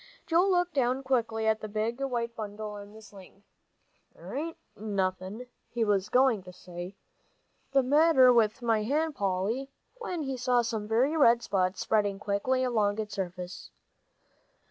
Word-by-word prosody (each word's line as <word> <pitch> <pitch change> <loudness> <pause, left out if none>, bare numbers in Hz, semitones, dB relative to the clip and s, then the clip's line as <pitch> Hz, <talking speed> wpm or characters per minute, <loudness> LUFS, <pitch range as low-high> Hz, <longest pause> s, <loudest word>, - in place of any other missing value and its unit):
Joel 340 +4 +3
looked 355 -2 +1
down 260 0 +1
quickly 230 -4 0
at 220 0 +1
the 215 - -5
big 220 +4 -2
white 235 -3 -2
bundle 210 0 -6
in 205 0 -10
the 220 +1 -14
sling. 195 -1 -15 0.7
"There - - -10
ain't 320 +4 -4 0.2
nothin' 195 +1 -3
" - - -46
He 235 - +2
was 200 -2 +1
going 250 -5 +3
to 180 0 -12
say, 180 +1 -9 0.8
"the 275 -1 +4
matter 270 -2 +5
with 230 +1 +2
my 225 -2 +2
hand, 300 +8 0
Polly," 205 +6 -1 0.3
when 360 -9 -4
he 270 -2 -3
saw 245 -1 +2
some 220 -2 -3
very 250 +8 +2
red 235 -6 +5
spots 190 -2 0
spreading 205 -2 +1
quickly 210 +6 0
along 215 -5 +1
its 215 -1 -4
surface. 180 -1 -6
225 Hz, 160 wpm, -29 LUFS, 205-260 Hz, 0.8 s, matter